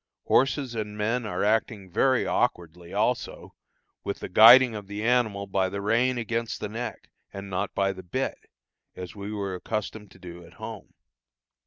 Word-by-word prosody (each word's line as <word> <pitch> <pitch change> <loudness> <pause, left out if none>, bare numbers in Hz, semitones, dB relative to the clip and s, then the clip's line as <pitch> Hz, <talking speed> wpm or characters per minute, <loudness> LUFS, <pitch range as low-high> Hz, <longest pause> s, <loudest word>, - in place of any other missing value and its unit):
Horses 135 0 +1
and 105 -2 -5
men 115 +2 -1
are - - -2
acting 105 -2 0
very 130 +5 +2
awkwardly, 85 0 -2
also, - - -2 0.5
with 100 - -3
the - - -7
guiding 120 +5 +8
of 105 -2 -7
the 105 +1 -5
animal 110 -4 +1
by 95 -1 0
the 100 - -5
rein 120 +5 +1
against 115 0 -3
the - - -4
neck, 115 +3 -6 0.2
and 100 0 -8
not 95 +2 -3
by 100 0 +1
the 95 - -10
bit, 130 +10 -4 0.5
as 90 +2 -8
we 100 0 -6
were 100 -2 -3
accustomed 105 +2 -5
to - - -18
do 90 -1 -11
at 85 - -16
home. - - -9
105 Hz, 170 wpm, -26 LUFS, 95-115 Hz, 0.5 s, guiding